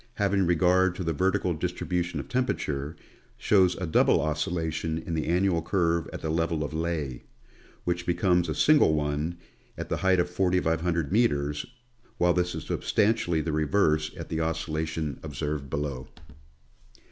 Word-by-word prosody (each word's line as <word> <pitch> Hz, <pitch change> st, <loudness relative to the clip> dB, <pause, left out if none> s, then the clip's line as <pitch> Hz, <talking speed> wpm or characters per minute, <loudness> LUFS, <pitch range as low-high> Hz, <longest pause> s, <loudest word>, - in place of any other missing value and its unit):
^ -, -, -30 dB
153 100 Hz, -1 st, +1 dB
ing 90 Hz, -, +2 dB
regard 90 Hz, +1 st, +3 dB
to 90 Hz, -, -4 dB
the 80 Hz, -1 st, -1 dB
vertical 90 Hz, +1 st, +1 dB
distribution 90 Hz, +1 st, -2 dB
of -, -, -6 dB
temperature, 80 Hz, -, -2 dB, 0.4 s
shows 95 Hz, -3 st, +3 dB
a 95 Hz, -, -4 dB
double 80 Hz, -, +3 dB
oscillation 80 Hz, +1 st, -2 dB
in 85 Hz, -, -5 dB
the 80 Hz, -1 st, -1 dB
annual 90 Hz, 0 st, +2 dB
curve 85 Hz, -2 st, 0 dB
at -, -, -7 dB
the 80 Hz, -, -1 dB
level 80 Hz, -1 st, 0 dB
of 75 Hz, -, -5 dB
Leh, 80 Hz, -5 st, -2 dB, 0.6 s
which 85 Hz, 0 st, -2 dB
becomes 90 Hz, -1 st, +2 dB
a 75 Hz, -, -2 dB
single 145 Hz, -, +5 dB
one 75 Hz, +3 st, -2 dB, 0.4 s
at -, -, -6 dB
the -, -, 0 dB
height 95 Hz, -1 st, +2 dB
of 85 Hz, -, +2 dB
4500 90 Hz, -3 st, 0 dB
meters, 75 Hz, -10 st, +1 dB, 0.5 s
while 90 Hz, 0 st, +3 dB
this 90 Hz, -1 st, 0 dB
is 80 Hz, -, -5 dB
substantially 105 Hz, -6 st, +1 dB
the 80 Hz, -, -2 dB
reverse 75 Hz, 0 st, +2 dB
of -, -, -7 dB
the 80 Hz, -, -2 dB
oscillation 80 Hz, -2 st, -2 dB
observed 75 Hz, -1 st, -4 dB
below. 70 Hz, -3 st, -3 dB
85 Hz, 160 wpm, -27 LUFS, 75-90 Hz, 0.6 s, single